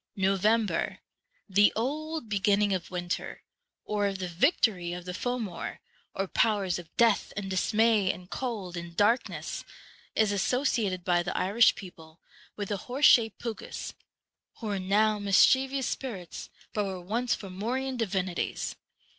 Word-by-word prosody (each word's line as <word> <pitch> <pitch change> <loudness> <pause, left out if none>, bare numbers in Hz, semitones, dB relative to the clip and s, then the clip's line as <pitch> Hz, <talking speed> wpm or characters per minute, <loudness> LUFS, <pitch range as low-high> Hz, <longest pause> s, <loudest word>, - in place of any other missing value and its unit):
November, 195 0 +1 0.5
the 205 +1 +5
old 305 +4 -2
beginning 205 0 +2
of 180 -3 -3
winter, 175 -1 -4 0.4
or 205 -1 0
of 195 -1 -3
the 185 -1 -3
victory 180 - +1
of 175 0 -7
the 180 - -5
Fomor, 220 -4 -3 0.4
or 195 0 -1
powers 195 -4 +1
of 170 -2 -11
death, 230 -3 +3
and 195 -1 -4
dismay, 210 +1 +3
and 180 +1 -12
cold, 215 -9 -4
and 170 -1 -7
darkness, 225 +4 +1 0.5
is 215 -2 +3
asso 250 +7 +1
ciated 200 -10 0
by 175 -2 +2
the 175 +2 -3
Irish 210 +6 +4
people 165 -4 -12 0.4
with 205 -2 -4
the 205 - -1
horse 255 +9 0
shaped 225 -3 +6
Pucas, 230 -2 -6 0.6
who 220 - -6
are 200 - -1
now 210 +3 +2
mischievous 260 +7 +4
spirits, 205 -12 -5 0.2
but 210 - 0
were 190 -2 -4
once 225 +7 -1
Fomorian 235 +8 -3
divinities. 190 -6 -2
205 Hz, 140 wpm, -28 LUFS, 185-230 Hz, 0.6 s, shaped